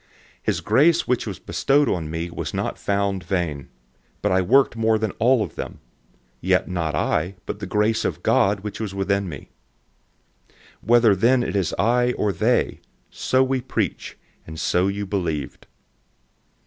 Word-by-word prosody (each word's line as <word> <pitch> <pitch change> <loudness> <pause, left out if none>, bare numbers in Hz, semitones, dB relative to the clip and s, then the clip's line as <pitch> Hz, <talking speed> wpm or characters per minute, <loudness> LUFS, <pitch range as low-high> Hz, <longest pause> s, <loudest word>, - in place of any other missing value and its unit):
His - - -1
grace 165 +4 +3
which 125 -2 0
was 100 - -5
bestowed 140 +1 +1
on 85 -7 -1
me 85 +2 -4
was - - -5
not - - -3
futile, 95 -7 -1 0.6
but - - +1
I 95 0 +3
worked 130 +7 +3
more 110 -1 +2
than 110 -2 -2
all 120 0 +4
of - - -7
them; - - -7 0.6
yet - - +2
not 85 -5 -2
I, 85 +6 0
but 105 - -5
the 100 - -5
grace 105 +3 +1
of - - -3
God 100 +1 +2
which 105 0 -6
was 105 -3 -4
with 95 0 -1
me. 95 -8 -3 1.0
015:011 - - -30 0.3
Whether 115 -3 +5
then 120 +6 +3
it - - -3
is 95 -5 0
I 120 +3 +2
or 105 - 0
they, 120 +5 +1 0.3
so 130 0 +1
we 130 0 0
preach, 125 - -3 0.3
and 80 0 -8
so 90 +2 +1
you 100 +1 -2
believed. 85 -8 -3
100 Hz, 160 wpm, -23 LUFS, 90-120 Hz, 1.0 s, Whether